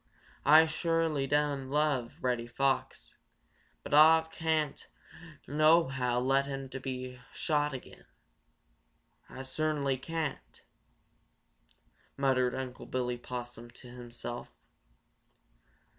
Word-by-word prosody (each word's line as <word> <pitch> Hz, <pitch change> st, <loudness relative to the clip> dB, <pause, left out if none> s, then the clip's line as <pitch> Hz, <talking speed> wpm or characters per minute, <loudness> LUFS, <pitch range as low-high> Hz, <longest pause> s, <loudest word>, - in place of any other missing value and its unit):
Ah 155 Hz, +2 st, +8 dB
sho'ly 160 Hz, -3 st, 0 dB
doan 145 Hz, -2 st, 0 dB
love 145 Hz, -5 st, 0 dB
Reddy 120 Hz, -2 st, 0 dB
Fox, 135 Hz, +2 st, -1 dB, 0.7 s
but -, -, -6 dB
Ah 160 Hz, +2 st, +7 dB
can't 160 Hz, -2 st, -2 dB, 0.6 s
nohow 140 Hz, -5 st, +3 dB
let 135 Hz, +2 st, +2 dB
him 135 Hz, -1 st, -5 dB
be 130 Hz, -1 st, -6 dB
shot 150 Hz, -2 st, 0 dB
again. 130 Hz, -2 st, -10 dB, 1.2 s
Ah 130 Hz, -, -8 dB
cert'nly 140 Hz, -1 st, -1 dB
can't!" 150 Hz, -, -5 dB, 1.5 s
muttered 130 Hz, -2 st, +2 dB
Unc' 130 Hz, -1 st, -6 dB
Billy 125 Hz, -1 st, -2 dB
Possum 120 Hz, -1 st, -7 dB
to 125 Hz, +1 st, -14 dB
himself. 120 Hz, 0 st, -7 dB
135 Hz, 90 wpm, -31 LUFS, 125-150 Hz, 1.5 s, Ah